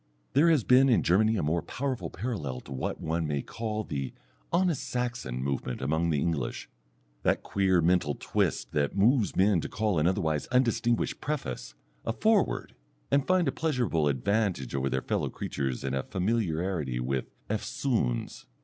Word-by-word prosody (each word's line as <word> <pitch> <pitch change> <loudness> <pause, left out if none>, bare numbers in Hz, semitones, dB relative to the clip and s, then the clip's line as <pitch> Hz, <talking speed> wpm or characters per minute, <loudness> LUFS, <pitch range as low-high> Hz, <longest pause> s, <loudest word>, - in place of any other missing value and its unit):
There 150 +5 +5
has 155 -7 +4
been 130 +3 +6
in 120 - +4
Germany 110 +5 +3
a 90 - 0
more 80 +3 +1
powerful 125 - -3
parallel 80 - -4
to - - -14
what 65 - -3
one 80 0 -1
may 70 -2 -1
call 110 -1 -3
the 70 -8 -4 0.4
"honest 175 -4 +2
Saxon" 120 - -3
movement 65 -2 -2
among 80 +5 0
the 75 -3 +1
English, 70 -5 -2 0.5
that - - +1
queer 95 -3 +2
mental 85 -4 +2
twist - - -1
that 70 +5 0
moves 115 +2 +3
men 95 -2 +4
to - - -5
call 105 -6 0
an 75 - +3
otherwise 80 -5 0
undistinguished 120 -2 +1
preface 65 - -4 0.3
a 115 - -1
"Foreword," 215 - +1 0.4
and 140 -1 +3
find 185 -2 +3
a - - +2
pleasurable 125 - 0
advantage 90 - 0
over 70 0 0
their 65 0 -1
fellow - - -1
creatures 65 -2 -3
in 65 -1 -2
a 65 - 0
familiarity 90 - -1
with 65 +1 -1 0.2
"eftsoons." 110 - -1
90 Hz, 160 wpm, -29 LUFS, 70-120 Hz, 0.5 s, been